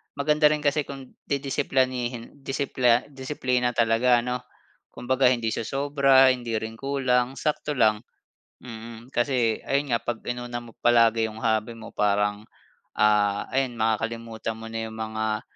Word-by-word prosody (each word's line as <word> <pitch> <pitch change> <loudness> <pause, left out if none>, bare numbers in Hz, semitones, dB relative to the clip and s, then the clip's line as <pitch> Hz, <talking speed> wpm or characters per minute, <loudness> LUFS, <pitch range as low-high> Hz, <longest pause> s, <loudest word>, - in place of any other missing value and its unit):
maganda 150 +1 +3
rin 150 0 +1
kasi 145 0 +2
kung 135 -2 -9 0.2
didisiplanihin 130 -3 -1
disipla 130 -3 +2
disiplina 130 -3 -1
talaga, 120 +1 +3
ano? 125 0 -2 0.5
Kumbaga 130 +1 +1
hindi 120 -3 +1
siya 110 - -3
sobra, 135 -1 +4
hindi 120 -3 -3
rin 110 +1 -4
kulang, 130 -2 0
sakto 150 0 -2
lang. 110 -4 +3 0.6
Mm, 115 0 -10
kasi 120 -3 0
ayun 140 0 -1
nga, - - -3
pag 120 -2 -3
inuna 120 0 -4
mo 120 -2 -14
palagi 115 -2 +4
yung 110 - -10
hobby 110 0 0
mo, 110 0 -11
parang 105 0 +1 0.5
ah, 105 -1 +2
ayun 130 -2 0
makakalimutan 115 0 -2
mo 115 0 -9
na 115 - -4
yung 110 - -9
mga, 110 0 -2
120 Hz, 145 wpm, -25 LUFS, 110-135 Hz, 0.6 s, sobra